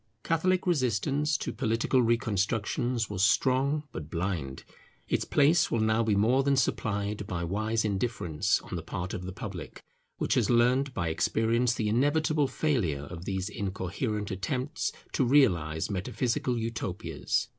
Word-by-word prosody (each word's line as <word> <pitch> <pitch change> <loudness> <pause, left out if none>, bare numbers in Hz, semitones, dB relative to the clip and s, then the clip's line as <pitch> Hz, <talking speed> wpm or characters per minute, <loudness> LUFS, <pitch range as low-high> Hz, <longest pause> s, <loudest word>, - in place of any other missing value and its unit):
Catholic 180 +3 +1
resistance 145 - +1
to - - -4
political 115 +1 +1
reconstructions 115 +1 0
was 100 -3 -3
strong, 135 +8 +2
but 75 -8 -7
blind: 85 -7 -3 0.4
its - - 0
place 150 +4 +4
will 115 - 0
now 110 +1 +2
be 110 -2 +2
more 115 +7 +3
than 140 0 +2
supplied 105 -4 -1
by 85 -1 -3
wise 110 +5 -1
indifference 100 -7 0
on - - -7
the - - -3
part 90 0 -5
of 90 - -5
the 95 - -5
public, 95 - -8 0.3
which - - 0
has - - +2
learnt 125 +3 +3
by 85 -3 -1
experience 115 +8 +1
the 110 - -1
inevitable 145 +5 +2
failure 105 - 0
of 90 0 -7
these 95 -1 -2
incoherent 105 +2 -3
attempts 130 - -2 0.2
to - - +2
realize 95 - +3
metaphysical 120 +6 -1
Utopias. 110 -3 -2
110 Hz, 145 wpm, -29 LUFS, 95-130 Hz, 0.4 s, place